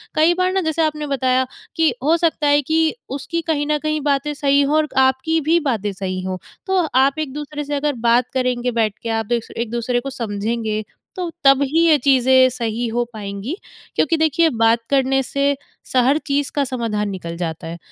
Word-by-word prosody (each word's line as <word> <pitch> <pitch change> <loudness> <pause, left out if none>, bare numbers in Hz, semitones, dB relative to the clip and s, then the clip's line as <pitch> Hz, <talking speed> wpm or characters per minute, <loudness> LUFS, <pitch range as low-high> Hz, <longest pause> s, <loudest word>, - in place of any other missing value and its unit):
कई 320 +3 +4
बार 365 0 +2
ना 385 - +1
जैसे 320 0 -1
आपने 300 -1 -3
बताया 260 -1 +1 0.3
कि 320 -5 +3
हो 320 +4 +3
सकता 325 -3 +1
है 290 0 +4
कि 320 - +1 0.2
उसकी 335 +5 -3
कहीं 290 -2 0
न 300 - +3
कहीं 305 0 -1
बातें 285 +2 0
सही 280 0 +2
हों 285 +2 +1
और 310 -1 +2
आपकी 265 +5 +3
भी 325 +3 +3
बातें 215 -6 0
सही 185 -1 -4
हों। 185 0 -3 0.3
तो 380 0 +2 0.2
आप 275 +3 +3
एक-दूसरे 295 0 -4
से 290 0 -3
अगर 290 0 0
बात 240 +1 +2
करेंगे 250 -1 0
बैठ 220 -3 +1
के, 230 - -3
आप 225 0 -1
दोस 235 +1 -2
एक-दूसरे 235 +1 -1
को 275 - -5
समझेंगे, 220 -2 -3 0.3
तो 360 -2 -3
तब 275 0 +6
ही 320 +5 +2
ये 310 -2 +6
चीज़ें 260 -1 +4
सही 235 -1 -3
हो 240 +2 0
पाएँगी 205 - -5 0.4
क्योंकि 320 +2 +2
देखिए 320 +1 +3
बात 225 +1 +4
करने 270 -1 +2
से 280 +2 0 0.3
स - - -9
हर 275 +3 +4
चीज़ 285 0 0
का 285 - +2
समाधान 230 -5 -2
निकल 170 -3 -6
जाता 165 -1 -4
है। 165 +1 -6
265 Hz, 200 wpm, -20 LUFS, 230-300 Hz, 0.4 s, तब